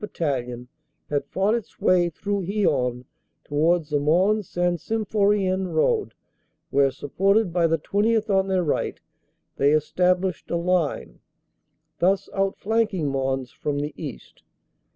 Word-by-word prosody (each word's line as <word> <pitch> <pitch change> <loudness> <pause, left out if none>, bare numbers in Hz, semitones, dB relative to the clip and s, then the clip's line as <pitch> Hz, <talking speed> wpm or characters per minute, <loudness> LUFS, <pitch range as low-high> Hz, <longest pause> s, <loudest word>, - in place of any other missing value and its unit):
Battalion 125 - -3 0.4
had 145 -1 0
fought 195 +6 +1
its 235 -3 -4
way 175 -1 +3
through 200 +4 -3
Hyon 130 - 0 0.4
towards 160 +2 +1
the 145 - +2
Mons 185 +8 +2
St. 175 -1 0
Sym 220 -1 -2
phorien 195 -3 +1
road, 425 - +1 0.6
where, 140 0 +4
supported 190 - +1
by 170 -2 +3
the 165 0 +1
20th. 215 +6 +1
on 195 -2 +2
their 190 -2 +1
right, 150 - -1 0.6
they 140 +2 +3
established 180 +4 +1
a 170 - 0
line, 170 - -1 0.8
thus 190 +2 +2
outflanking 195 -3 0
Mons 135 -2 -2
from 145 -1 -3
the 145 +1 -3
east. 145 -7 -9
175 Hz, 130 wpm, -24 LUFS, 145-195 Hz, 0.8 s, where